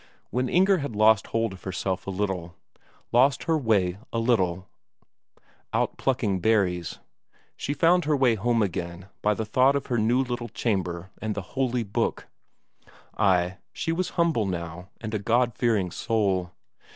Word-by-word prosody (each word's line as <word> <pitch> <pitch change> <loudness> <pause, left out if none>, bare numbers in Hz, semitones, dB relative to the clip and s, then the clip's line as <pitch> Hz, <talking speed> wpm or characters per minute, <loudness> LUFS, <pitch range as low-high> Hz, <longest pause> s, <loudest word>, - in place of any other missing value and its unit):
When 125 0 0
Inger 190 +1 +4
had 140 -6 -4
lost 110 -1 +4
hold 115 -3 -1
of 95 - -12
herself 95 +1 -3
a - - -2
little, 95 -3 -3 0.6
lost 130 +3 +4
her 165 -2 +1
way 100 - +1
a - - -2
little 95 -6 +1 1.1
out - - 0
plucking 110 -8 0
berries, 90 -5 +1 0.6
she 145 - -3
found 170 +1 +4
her 150 -1 +2
way 130 -3 +4
home 115 +1 +1
again 90 0 -4
by 105 0 +2
the 110 - -3
thought 130 +6 +3
of 140 - -1
her 120 -2 0
little 120 +1 0
chamber 95 -5 -2
and 110 -1 -2
the 100 - -4
holy 125 -2 0
book; 100 - -2 0.9
ay, 95 -3 +2 0.2
she 165 - -2
was 180 +2 -1
humble 165 - +2
now 90 0 -5
and 110 -1 -6
a 110 - 0
Godfearing 115 -3 +1
soul. 95 -6 0
110 Hz, 150 wpm, -26 LUFS, 95-125 Hz, 1.1 s, Inger